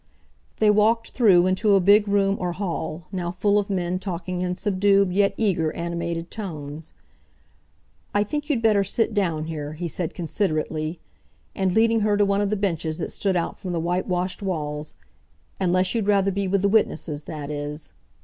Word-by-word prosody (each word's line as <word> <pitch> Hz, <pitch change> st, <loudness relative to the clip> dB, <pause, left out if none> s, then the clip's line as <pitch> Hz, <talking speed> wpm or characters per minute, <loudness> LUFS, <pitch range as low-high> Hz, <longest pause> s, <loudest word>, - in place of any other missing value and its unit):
They 215 Hz, -1 st, +4 dB
walked 220 Hz, +2 st, +2 dB
through 190 Hz, -8 st, +5 dB
into 190 Hz, +2 st, +3 dB
a -, -, +5 dB
big 205 Hz, +3 st, +5 dB
room 200 Hz, -1 st, +2 dB
or 175 Hz, -1 st, -2 dB
hall, 175 Hz, -3 st, -4 dB
now 180 Hz, -2 st, -3 dB
full 205 Hz, +3 st, +2 dB
of 205 Hz, -, -3 dB
men 180 Hz, -2 st, -1 dB
talking 180 Hz, -1 st, -4 dB
in 180 Hz, 0 st, -1 dB
subdued 195 Hz, 0 st, +2 dB
yet 200 Hz, +1 st, +2 dB
eager, 175 Hz, -8 st, +1 dB
animated 170 Hz, 0 st, -4 dB
tones. 155 Hz, -7 st, -7 dB, 1.2 s
"I 205 Hz, -, +2 dB
think 295 Hz, +7 st, -4 dB
you'd 250 Hz, -6 st, 0 dB
better 210 Hz, -3 st, +4 dB
sit 225 Hz, +3 st, 0 dB
down 170 Hz, -7 st, 0 dB
here," 155 Hz, -2 st, -5 dB
he 170 Hz, +3 st, -4 dB
said 170 Hz, 0 st, -4 dB
considerately, 160 Hz, -2 st, -2 dB, 0.5 s
and, 190 Hz, -1 st, 0 dB
leading 225 Hz, 0 st, +4 dB
her 210 Hz, -1 st, +2 dB
to 205 Hz, -, +4 dB
one 200 Hz, 0 st, +1 dB
of 205 Hz, -, 0 dB
the 215 Hz, -, 0 dB
benches 165 Hz, -5 st, -1 dB
that 175 Hz, -, -4 dB
stood 195 Hz, -2 st, -1 dB
out 170 Hz, -, -1 dB
from 185 Hz, -3 st, -4 dB
the 170 Hz, -, -1 dB
whitewashed 180 Hz, +2 st, -1 dB
walls—"unless 180 Hz, +2 st, -3 dB
you'd 225 Hz, -4 st, -1 dB
rather 200 Hz, -1 st, +3 dB
be 200 Hz, 0 st, -1 dB
with 195 Hz, +1 st, +1 dB
the -, -, +4 dB
witnesses, 165 Hz, -8 st, 0 dB
that 150 Hz, -2 st, -6 dB
is." 145 Hz, +1 st, -6 dB
185 Hz, 175 wpm, -24 LUFS, 170-205 Hz, 1.2 s, through